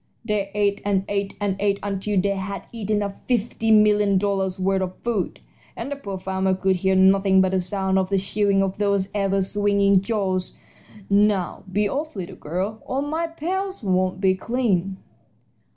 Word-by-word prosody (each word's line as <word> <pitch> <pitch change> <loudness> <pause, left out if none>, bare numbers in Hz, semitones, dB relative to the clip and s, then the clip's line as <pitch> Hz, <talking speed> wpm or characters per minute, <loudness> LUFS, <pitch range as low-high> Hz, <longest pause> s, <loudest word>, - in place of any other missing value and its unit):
They 210 -3 -1
ate 205 -1 +1
and 195 -1 0
ate 200 -1 -2
and 205 -2 0
ate 200 -1 +1
until 200 0 -1
they 200 +1 +1
had 195 +1 -5
eaten 210 -2 -1
up 200 -1 -6
fifty 225 -2 0
million 210 -2 +5
dollars' 190 -1 0
worth 190 +1 +1
of 185 0 -3
food, 225 -6 -2 0.3
and 280 - -5
the - - -1
poor 200 -9 -6
farmer 190 0 0
could 190 0 +1
hear 190 +1 +1
nothing 190 0 +5
but 190 0 +3
the 190 -1 +1
sound 190 +1 0
of 185 -1 -1
the 195 - +2
chewing 195 0 +1
of 195 +1 -3
those 200 -2 +1
ever 195 -1 +1
swinging 200 -1 +3
jaws. 195 -4 -2 0.5
Now, 200 -2 +2
be 205 +2 +1
off, 295 +6 -3
little 190 -1 -6
girl, 190 +8 -4
or 270 +2 -1
my 320 +3 -2
pails 375 - -4
won't 185 -1 +1
be 190 -1 +3
clean." 195 -3 -1
200 Hz, 175 wpm, -23 LUFS, 190-210 Hz, 0.5 s, million